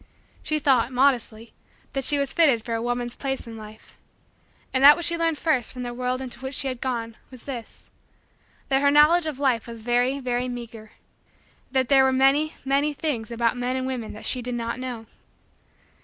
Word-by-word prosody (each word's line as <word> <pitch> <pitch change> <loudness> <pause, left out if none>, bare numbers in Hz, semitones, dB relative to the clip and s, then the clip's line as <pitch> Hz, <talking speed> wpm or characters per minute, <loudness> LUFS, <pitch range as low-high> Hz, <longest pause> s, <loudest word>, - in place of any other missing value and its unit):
She 310 - 0
thought, 265 -4 +2
modestly, 245 -4 0 0.4
that 270 -1 -2
she 290 +2 +3
was 280 -1 -1
fitted 275 -10 +3
for 230 - -3
a 225 - -1
woman's 245 0 -3
place 270 -1 -4
in 230 -1 -9
life. 215 0 -13 0.7
And 260 0 +2
that 290 +1 +9
which 345 - -2
she 340 - +2
learned 330 -2 0
first 280 -8 0
from 250 -1 -7
the 240 0 -5
world 250 +1 -2
into 245 -2 -8
which 265 +1 -5
she 275 - -2
had 255 -2 -5
gone 230 -3 -3
was 255 -3 -13
this: 245 -5 -8 0.8
that 270 0 +2
her 285 - +4
knowledge 310 +4 +5
of 300 -4 -4
life 260 -5 0
was 230 -1 -9
very, 245 +3 +1
very, 250 -1 -2
meager; 230 -3 -8 0.8
that 260 -2 +1
there 270 0 +5
were 265 - +3
many, 275 +4 +2
many, 280 +2 +1
things 260 -8 -3
about 235 0 0
men 250 +1 -2
and 260 0 -2
women 250 -4 -4
that 215 - -10
she 255 - +1
did 245 0 -4
not 235 +1 -3
know. 245 -3 -6
255 Hz, 200 wpm, -24 LUFS, 235-275 Hz, 0.8 s, that